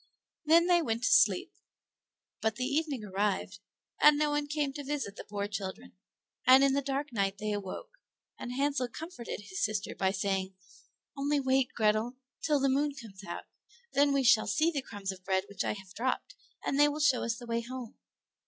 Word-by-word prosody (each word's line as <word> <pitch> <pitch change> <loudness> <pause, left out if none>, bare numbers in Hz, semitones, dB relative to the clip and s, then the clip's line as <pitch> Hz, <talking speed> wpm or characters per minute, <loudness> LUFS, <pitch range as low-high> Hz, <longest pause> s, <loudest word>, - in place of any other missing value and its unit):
Then 330 +2 +6
they 350 -1 +4
went 230 -5 -2
to - - +3
sleep; 470 - +4 0.9
but 220 -2 0
the 250 - -3
evening 285 -3 -1
arrived, 200 0 -1 0.4
and 300 -1 +7
no 300 0 +2
one 295 0 0
came 290 -2 -1
to 290 0 -6
visit 275 -8 -3
the - - -8
poor 205 -1 -4
children, 190 - -6 0.5
and 260 +1 +8
in 275 -1 +4
the 280 - +2
dark 280 0 -3
night 195 -2 0
they 215 +1 -3
awoke, 205 - -5 0.5
and 245 - -5
Hansel 275 -1 0
comforted 245 - -7
his 190 -2 -4
sister 215 -1 -1
by 190 - +1
saying, 190 0 -1 0.6
"Only 285 +1 +1
wait, 265 -1 +2
Grethel, 215 +3 +1 0.3
till 300 -2 +2
the 275 - +2
moon 280 +2 +1
comes 205 -5 -11
out, - - -6 0.5
then 285 0 +4
we 275 -1 +2
shall 230 -3 +5
see 320 +2 +2
the 285 -4 -2
crumbs 205 -6 -5
of 185 -1 -11
bread 190 0 +1
which 200 - -3
I - - 0
have 195 -2 -11
dropped, 260 - -2 0.3
and 275 - 0
they 295 - +7
will 295 +1 -2
show 285 -4 +3
us 230 0 -1
the 240 - -9
way 235 0 -1
home." 245 -1 -8
250 Hz, 195 wpm, -31 LUFS, 205-285 Hz, 0.9 s, and